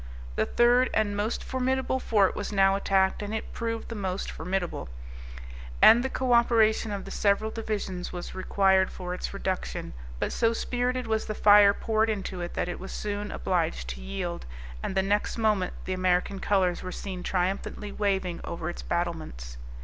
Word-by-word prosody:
The 110 - +1
third 245 +2 +4
and 210 -2 +1
most 210 +3 -1
formidable 260 0 0
fort 205 -6 +2
was 205 - -4
now 195 -1 +4
attacked, 195 -1 +2
and 205 +1 -3
it 220 - -5
proved 230 -1 -3
the - - -5
most 190 -3 -3
formidable, 180 - -3 0.9
and 235 - +8
the 265 - -1
co 255 -2 0
operation 225 -2 +3
of 200 -1 -4
the - - -8
several 210 +2 +1
divisions 205 -5 -4
was 175 -1 -6
required 190 0 +3
for 180 -1 -6
its 180 - -4
reduction; - - -3 0.2
but - - -2
so 230 -1 +2
spirited 250 +2 -1
was 220 -1 0
the 215 - -3
fire 205 -1 +7
poured 220 0 +1
into 195 -4 -3
it 175 - -5
that - - -1
it 175 - -4
was 190 - -8
soon 205 0 -4
obliged - - -1
to 60 +1 -6
yield, 65 0 -4 0.3
and - - -3
the 190 - +3
next 205 +3 0
moment 210 -5 +1
the 185 - -2
American 185 +1 +1
colors 185 -4 +1
were 185 - -6
seen 185 -1 -6
triumphantly 190 +3 -2
waving 190 -4 -1
over 170 0 -4
its - - -8
battlements. 160 - -4
200 Hz, 175 wpm, -27 LUFS, 180-220 Hz, 0.9 s, and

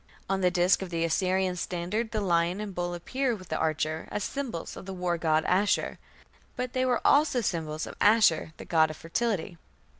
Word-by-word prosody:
On 195 0 0
the 180 - +4
disk 180 +1 +3
of 190 - -5
the 165 -1 -1
Assyrian 185 +2 +1
standard 180 +6 -2
the 215 -2 -2
lion 175 0 +1
and 210 -1 -4
the - - -12
bull 175 0 -2
appear 255 +8 -1
with 185 -4 -12
"the - - -1
archer" 155 0 -1
as 210 - -3
symbols 250 -12 -4
of - - -10
the 190 - -5
war 180 -1 0
god 160 -1 +2
Ashur, 195 +3 +1 0.6
but 250 -1 -4
they 255 -1 +1
were 245 -2 0
also 285 -3 +4
symbols 160 -6 -2
of - - -8
Ashur 205 -7 +4
the - - -9
god 160 -2 +3
of 155 - -7
fertility. 180 -1 -2
180 Hz, 205 wpm, -28 LUFS, 170-210 Hz, 0.6 s, the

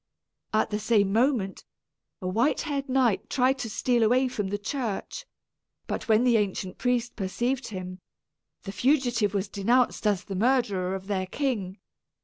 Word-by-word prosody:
At 215 0 +1
the 210 - -1
same 210 -3 +2
moment, 230 -5 +1 0.6
a - - -2
white 230 +10 +1
haired 280 -3 -3
knight 255 -6 +2
tried 265 +1 +2
to 230 - -3
steal 240 +2 +1
away 250 +4 +3
from 210 -5 -3
the 205 +2 -2
church; 250 - -4 0.6
but - - -4
when 220 +1 +4
the 245 -2 +4
ancient 190 -3 -2
priest 245 -1 0
perceived 240 +6 -2
him, 185 -3 -7 0.6
the 195 - -5
fugitive 240 -3 +1
was 200 0 0
denounced 230 +3 +1
as 205 -2 +1
the 195 - -7
murderer 195 -4 +1
of 190 0 -7
their 190 -2 -2
king. 210 -7 -2
220 Hz, 155 wpm, -27 LUFS, 195-255 Hz, 0.6 s, when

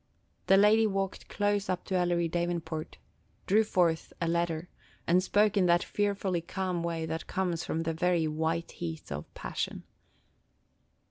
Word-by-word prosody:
The 195 - +6
lady 215 +2 +5
walked 195 -1 -3
close 205 -1 0
up 185 -1 -2
to - - -4
Ellery 175 -1 +2
Davenport, 170 -2 -3 0.5
drew 215 +3 +4
forth 175 -6 +1
a 170 - 0
letter, 170 0 0 0.4
and 180 +2 +4
spoke 210 +2 +3
in 190 -3 +4
that 175 0 +4
fearfully 200 -4 -1
calm 180 0 -2
way 165 -1 -2
that 160 0 -4
comes 175 -3 -1
from 165 - -2
the 165 0 -1
very 175 -1 +1
white 160 +2 -1
heat 160 - -6
of 70 +1 -6
passion. - - -4
175 Hz, 150 wpm, -30 LUFS, 165-195 Hz, 0.5 s, The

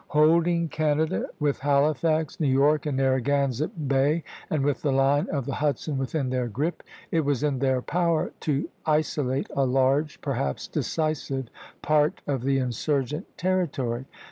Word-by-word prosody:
Holding 165 +3 +3
Canada, 155 +3 0
with 145 -2 0
Halifax, 150 +2 +1
New 155 - +1
York, 145 +3 +3
and 140 -3 -1
Narragansett 135 +2 0
Bay, 140 +4 +2 0.3
and 150 -3 0
with 145 -1 0
the 145 - +1
line 135 +2 +2
of 140 -4 -2
the 140 - -3
Hudson 145 -1 -1
within 135 0 -2
their 125 -1 0
grip, 145 +10 -2 0.3
it 165 - +2
was 140 -1 0
in 145 -3 0
their 130 -2 +1
power 170 -2 0
to 145 0 -1 0.2
isolate 150 -3 0
a 140 - +2
large, 135 +4 +1
perhaps 120 - -2
decisive, 140 -5 -2 0.3
part 150 0 +2
of 135 -4 -1
the 135 +2 +1
insurgent 135 - -1
territory. 140 -10 -1
145 Hz, 145 wpm, -26 LUFS, 135-155 Hz, 0.3 s, Holding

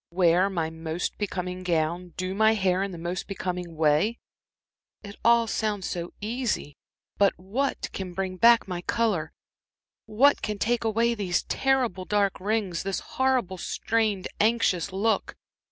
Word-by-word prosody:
"Wear 180 +2 +3
my 165 -4 -2
most 160 +1 -4
becoming 180 -3 -3
gown, 170 0 -1
do 185 +1 -2
my 220 +2 +4
hair 190 -1 +1
the 185 -3 -8
most 175 +2 -4
becoming 180 -3 -4
way! 160 +9 +2 0.9
It 200 -1 -9
all 235 0 +5
sounds 210 -4 -2
so 175 -1 -4
easy. 220 - -2 0.4
But 200 -1 +4
what 235 +10 -2
can 185 -2 -5
bring 190 -1 -3
back 235 +1 +6
my 180 -2 -4
color, 205 -7 0 0.8
what 255 +7 +4
can 210 -1 -3
take 235 +3 0
away 230 +1 +2
these 195 -5 -1
terrible 250 -9 0
dark 200 -1 +1
rings, 200 -3 -1
this 195 -1 -2
horrible 255 -8 0
strained, 220 -4 -1
anxious 210 -5 +2
look? 210 +4 0
195 Hz, 140 wpm, -26 LUFS, 180-225 Hz, 0.9 s, back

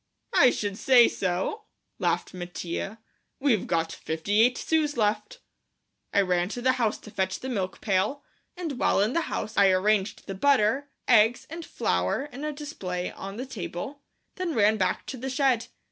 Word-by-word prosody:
"I - - +7
should 205 -4 -3
say 250 -3 +6
so," 190 - -2 0.3
laughed 175 -1 0
Mattia; 175 +3 -5 0.4
"we've 260 -8 +2
got 165 0 0
fifty 180 +7 0
eight 245 +2 +4
sous 305 -4 0
left." 210 -1 -1 0.7
I 200 - +4
ran 180 -1 +1
to 245 - -5
the 260 - +5
house 240 -4 0
to 215 - -13
fetch 190 -1 -1
the 260 - -5
milk 195 -7 -3
pail, 205 +8 0 0.3
and 320 -8 -4
while - - +3
in 210 +5 +2
the 335 - +2
house 215 - -4
I 200 -1 +6
arranged 195 +2 +1
the 195 - -5
butter, 270 +4 +2 0.2
eggs, 230 0 +4
and 335 +1 -6
flour 90 - -1
in 280 0 -9
a 305 - -1
display 195 - -5
on 195 +1 -8
the 255 - -4
table, 215 - -6 0.4
then 360 -5 -2
ran 215 0 +4
back 185 -2 0
to 265 - -6
the 265 +2 -4
shed. 260 -3 +1
215 Hz, 175 wpm, -27 LUFS, 190-265 Hz, 0.7 s, I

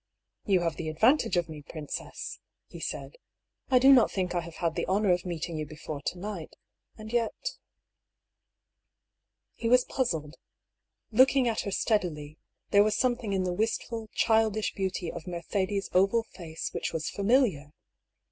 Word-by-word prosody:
" - - -57
You 190 -3 +4
have 165 -2 -1
the 160 -2 -3
advantage 225 - +3
of 175 - +1
me, 155 -2 -8
princess," 150 +1 -6 0.3
he - - -11
said. - - -5 0.3
" - - -46
I 255 - +5
do 265 +2 +8
not 245 -4 +6
think 185 -2 -2
I 175 - +1
have 170 -1 -8
had 165 -2 -1
the - - -2
honour 195 +1 +2
of 180 +1 -2
meeting 165 -1 -3
you 155 - -3
before 150 -1 -7
to 180 - -3
night. 185 -3 -6 0.4
And 220 +1 -9
yet 240 - -1 1.4
" - - -58
He 230 - +1
was 250 +1 +5
puzzled. 160 - -2 0.7
Looking 260 +2 +5
at 225 -1 0
her 200 - -4
steadily, 160 -9 -1 0.3
there 200 0 +7
was 210 0 +1
something 240 -4 0
in 190 -1 +1
the 180 -1 -1
wistful, 225 +2 -2
childish 220 -1 +2
beauty 190 -3 -2
of 170 0 -8
Mercedes' 190 +3 -2
oval 195 +5 +4
face 170 -7 -7
which - - -2
was 160 -1 -2
familiar. 200 - +2
190 Hz, 165 wpm, -29 LUFS, 165-225 Hz, 1.4 s, do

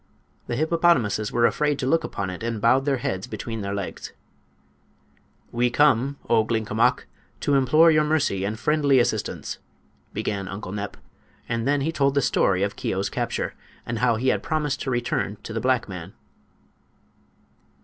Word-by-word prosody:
The 120 - -2
hippopotamuses 155 - +2
were 120 -1 +3
afraid 150 +2 +1
to 130 - -3
look 165 +4 +2
upon 95 -9 -4
it, 90 - -8
and 115 -1 -2
bowed 130 +5 +3
their 140 -2 +1
heads 95 -5 -3
between 110 +1 -5
their 100 0 -3
legs. 100 -2 -6 1.4
"We 120 +1 +1
come, 140 +1 +3
O 115 -2 +4
Glinkomok, 110 0 +1 0.4
to 145 - +1
implore 155 +5 +5
your 155 -1 +4
mercy 150 -11 +1
and 105 +2 -2
friendly 145 +2 +2
assistance!" 120 - -1 0.5
began 100 -2 -3
Uncle 95 0 -6
Nep; 100 0 -5 0.5
and 115 +1 -2
then 145 0 +2
he 155 +4 0
told 140 -3 +1
the 140 - +3
story 95 -3 +2
of 100 +1 -2
Keo's 95 +1 -2
capture, - - -2 0.3
and 115 -1 -3
how 125 -2 +3
he 130 +4 +1
had - - +1
promised 150 -4 -1
to - - -3
return 120 -4 -1
to 110 - -7
the 115 - -2
black 130 -2 +1
man. 90 -1 -8
120 Hz, 165 wpm, -24 LUFS, 105-140 Hz, 1.4 s, implore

